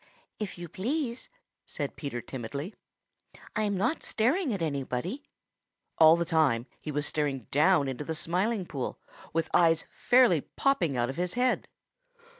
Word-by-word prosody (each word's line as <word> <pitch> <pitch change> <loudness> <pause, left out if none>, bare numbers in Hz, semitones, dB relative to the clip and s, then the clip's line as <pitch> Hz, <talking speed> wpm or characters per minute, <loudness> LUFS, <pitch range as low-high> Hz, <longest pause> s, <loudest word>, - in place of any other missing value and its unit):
"If 210 -4 -4
you 175 0 -6
please," 240 - -3 0.4
said 145 -3 -4
Peter 140 -5 -4
timidly, 135 - -6 0.8
"I'm 210 -2 0
not 245 - 0
staring 270 - +1
at 200 - -1
anybody." 150 - -2 0.8
All 160 0 +9
the 170 0 -1
time 155 -8 +2
he 155 - -5
was 145 0 -1
staring 145 -4 0
down 150 0 +4
into 135 +2 -4
the 160 +2 -3
Smiling 185 +6 0
Pool 135 -6 -4 0.3
with 165 0 0
eyes 165 -2 +4
fairly 245 - +4
popping 175 - 0
out 120 +1 +1
of 135 - -11
his 180 0 -2
head. 250 0 +1
165 Hz, 145 wpm, -29 LUFS, 145-215 Hz, 0.8 s, All